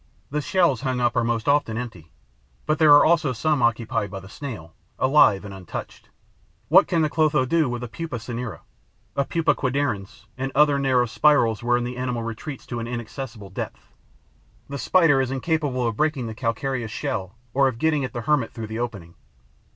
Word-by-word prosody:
The 150 +1 -1
shells 170 -7 +2
hung 130 -2 -1
up 120 0 +1
are - - +2
most 115 -1 -1
often 140 -6 +2
empty; 95 -10 -7 0.5
but 155 - 0
there 155 -2 +6
are 145 - +8
also 160 -5 +3
some 150 +3 0
occupied 115 -3 0
by 95 0 -6
the 95 - -13
Snail, 100 - -8 0.2
alive 130 -8 +4
and 100 - -8
untouched. 95 -3 -8 0.6
What 190 +6 +6
can 170 -3 +1
the - - +3
Clotho 155 -4 +2
do 155 +1 +2
with 120 0 -4
a - - -4
Pupa 160 +4 -6
cinerea, 115 +1 -6 0.5
a 140 - +1
Pupa 165 +2 +1
quadridens 125 -6 -2
and 135 +1 -2
other 145 -2 +4
narrow 130 -3 +3
spirals 120 -2 +3
wherein 120 0 +1
the 125 +1 -5
animal 125 -2 -2
retreats 115 +5 -6
to 120 - -5
an 115 - -4
inaccessible 120 -3 -6
depth? - - -7 0.8
The 140 0 -5
Spider 155 0 +4
is 130 - -1
incapable 135 -2 -1
of 115 -2 -3
breaking 150 -5 0
the 110 - -5
calcareous 115 +1 -2
shell 110 -5 -4 0.2
or 135 0 +4
of 125 -4 -2
getting 150 +1 +1
at 130 - -3
the 120 - -4
hermit 130 -1 +1
through 115 - -6
the 110 - -3
opening. 100 -9 -5
125 Hz, 190 wpm, -24 LUFS, 115-145 Hz, 0.8 s, are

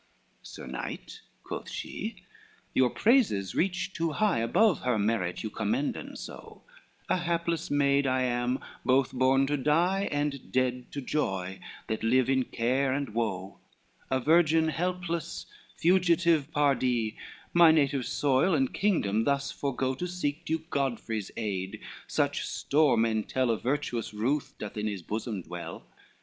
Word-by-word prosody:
XXXVI - - -14
"Sir - - -9
Knight," 445 - -6 0.2
quoth - - -6
she, 225 - -5 0.6
"your 130 -1 +4
praises 205 - +2
reach 185 +1 -1
too 165 -2 -1
high 205 - +2
Above 180 - +3
her 125 -3 0
merit 100 -4 0
you 110 - -4
commenden 255 - -2
so, - - -10 0.4
A - - +2
hapless 170 -1 -1
maid 140 -1 +3
I 130 0 +2
am, 125 +1 0 0.2
both 130 0 +3
born 130 +1 +3
to 145 +2 0
die 175 +8 +2
And 145 -2 -2
dead 125 -1 0
to 140 - -3
joy, 95 -10 -2 0.3
that 110 -1 -3
live 130 +3 +3
in 130 -1 +2
care 130 +3 0
and 135 -4 -2
woe, 95 -4 -2 0.5
A 130 - +1
virgin 160 +2 +4
helpless, 175 -1 -3 0.3
fugitive 170 -4 +3
pardie, 130 -7 +1 0.4
My 170 -1 +8
native 140 -5 +2
soil 145 +5 +2
and 135 -3 +1
kingdom 115 - +1
thus 140 0 0
forego 130 -1 -1
To 175 +7 -4
seek 165 -4 -3
Duke 160 +1 -3
Godfrey's 120 -6 -2
aid, 95 -4 -3 0.3
such - - 0
store 145 -4 +2
men 110 -1 +2
tell 130 +1 0
Of 110 - -2
virtuous 125 -5 -2
ruth 130 +7 -1
doth 105 0 -7
in 105 0 -1
his 100 -4 -4
bosom 105 0 -4
dwell. 85 0 -8
135 Hz, 145 wpm, -29 LUFS, 115-160 Hz, 0.6 s, My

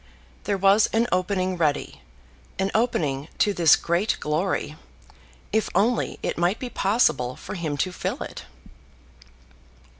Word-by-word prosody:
There 200 0 0
was 195 +3 +5
an 225 +1 +3
opening 185 0 0
ready, 145 - -1 0.6
an 190 +1 0
opening 155 - 0
to 205 - +2
this 165 -5 +6
great 175 +6 0
glory, 155 0 -1 0.8
if 220 0 +1
only 225 +6 +1
it - - -2
might 175 +5 +2
be 250 -2 -6
possible 165 - +1
for - - -8
him 160 -6 -3
to 185 +6 0
fill - - -4
it! - - -9
185 Hz, 130 wpm, -24 LUFS, 155-205 Hz, 0.8 s, this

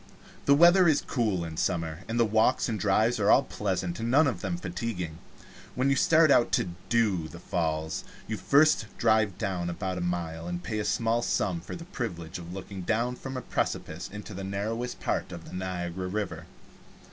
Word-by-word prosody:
The 140 - +7
weather 175 +4 +7
is 155 -3 +3
cool 105 -9 0
in 80 -1 -7
summer, 80 -3 -1
and 115 +1 -1
the 115 - +5
walks 110 +3 +2
and 110 -3 -2
drives 110 +5 +2
are 100 - +2
all 135 - +6
pleasant 95 -6 -2
and 115 +1 -2
none 145 +6 +5
of 130 - -1
them 175 - -2
fatiguing. 105 - -4 0.6
When 130 +2 +2
you - - +3
start 160 +2 +5
out 120 -7 +4
to 90 - +2 0.2
"do" 105 -9 +2
the 85 - -10
Falls 80 -2 -2 0.2
you 110 - -2
first 140 -1 +4
drive 110 -4 +2
down 90 -3 -2
about 90 +2 -3
a - - -3
mile, 85 -2 -3
and 90 0 -4
pay 110 -1 -3
a 105 - -2
small 115 +1 +1
sum 95 -6 0
for 90 - -7
the 165 - -8
privilege 90 - -5
of 85 0 -9
looking 95 +1 -7
down 115 +7 0
from 135 +1 -6
a - - -3
precipice - - -3
into 105 +1 -8
the 95 +1 -6
narrowest 110 +5 -3
part - - -2
of 85 -2 -8
the - - -11
Niagara 90 0 -3
River. 105 +2 -4
100 Hz, 195 wpm, -28 LUFS, 90-120 Hz, 0.6 s, The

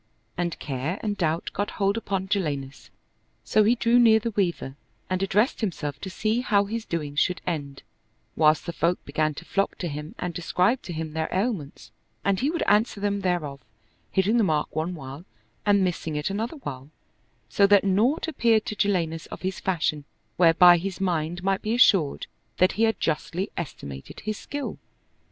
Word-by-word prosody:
And 175 -1 -2
care 145 +7 -3
and 210 -2 -1
doubt 165 -3 -1
got 205 +1 -2
hold 200 0 +2
upon 195 -4 -2
Jalinus: 140 - -3 0.5
so 210 - +3
he 225 +4 +4
drew 235 +1 +3
near 225 -2 +7
the 230 +1 -2
Weaver 175 -9 -1 0.4
and 185 0 0
addressed 210 +7 +1
himself 150 -8 -3
to 190 - -5
see 215 +5 0
how 205 -4 +2
his 225 +2 -4
doings 150 -3 -2
should 180 - +1
end, 145 -6 -4 0.5
whilst 155 -1 +3
the 170 - -4
folk 170 +2 0
began 155 +1 0
to - - -9
flock 195 0 -1
to 175 - -3
him 150 0 -6
and 180 -1 -4
describe 180 +8 +1
to - - -8
him 160 -1 -5
their 160 0 -2
ailments, 190 - -3 0.3
and 200 -1 +2
he 275 - +1
would 335 +1 -1
answer 210 0 +2
them 200 0 -1
thereof, 170 -7 -1 0.5
hitting 200 +4 +2
the 230 - +4
mark 155 -7 0
one 165 +3 -2
while 140 +1 -9 0.4
and 200 -1 +4
missing 165 -3 -2
it 150 +5 -1
another 225 +9 -3
while, 140 - -7 0.6
so 200 - +4
that 200 -1 +5
naught 215 - +2
appeared 230 -8 +2
to 215 - -4
Jalinus 170 -6 0
of - - -9
his 190 0 -2
fashion 155 -5 -1 0.3
whereby 175 0 +7
his 190 +1 -5
mind 175 -2 -1
might 195 0 +1
be 220 +2 -1
assured 195 - +4 0.3
that 185 +1 +4
he 225 - +2
had 225 - 0
justly 170 +4 -2
estimated 70 - -7
his 215 0 -4
skill. 285 -1 -5
185 Hz, 180 wpm, -25 LUFS, 155-205 Hz, 0.6 s, near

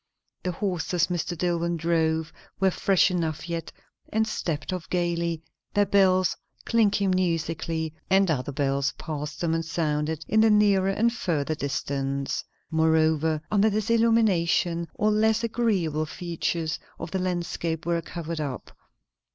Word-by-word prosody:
The 180 - -2
horses 180 -2 0
Mr. 175 0 -2
Dillwyn 170 0 0
drove 160 -1 0 0.3
were 190 -1 +3
fresh 190 +1 +3
enough 165 -2 -2
yet, 170 -1 -4 0.4
and 220 0 +1
stepped 165 -6 -3
off 180 -3 -5
gaily, 170 -2 -1 0.3
their 205 0 +4
bells 185 -2 +3 0.3
clinking 205 -4 +2
musically; 165 -3 -1 0.2
and 190 -2 +4
other 135 -2 -1
bells 140 0 0
passed 150 -1 -6
them 165 -2 +1
and 165 0 0
sounded 160 -1 -1
in 220 +1 +3
the 225 - +5
nearer 205 -2 +4
and 230 +4 +2
further 160 -9 -1
distance. 140 -1 -2 0.3
Moreover, 160 -1 +2
under 210 +1 +4
this 215 +2 -1
illumination 185 -7 +2
all 215 +1 +2
less 220 +2 +2
agreeable 190 -10 0
features 165 -1 -2 0.2
of 165 0 -6
the 190 - -1
landscape 170 -3 -2
were 170 0 +1
covered 165 -1 -5
up. 140 -4 -6
170 Hz, 135 wpm, -26 LUFS, 160-195 Hz, 0.4 s, the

